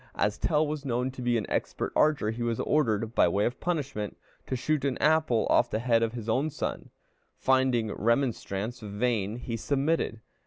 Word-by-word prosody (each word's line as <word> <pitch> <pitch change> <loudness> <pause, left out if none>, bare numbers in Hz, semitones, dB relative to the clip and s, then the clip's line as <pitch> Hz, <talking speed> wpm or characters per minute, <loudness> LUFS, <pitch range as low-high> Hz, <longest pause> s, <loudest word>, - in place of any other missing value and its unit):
As 105 - 0
Tell 155 -1 +2
was 150 -1 -4
known 125 -1 -1
to 130 - -9
be 120 -1 +2
an 110 - -2
expert - - -2
archer, 150 -8 +3
he 115 +2 -6
was 115 -1 -1
ordered, 115 -7 +1
by - - +4
way 100 +4 +1
of 120 - -2
punishment, 140 - -3 0.3
to 130 - -1
shoot 150 +2 0
an 140 -2 0
apple 155 -7 +3
off 120 - +4
the - - -1
head 115 0 +2
of 115 0 0
his 115 -3 -6
own 130 +7 +1
son. 150 - -4 0.5
Finding 130 -4 +2
remonstrance 115 -2 -1
vain, 105 0 -1
he 120 -1 -4
submitted. 140 -1 0
120 Hz, 185 wpm, -28 LUFS, 110-140 Hz, 0.5 s, by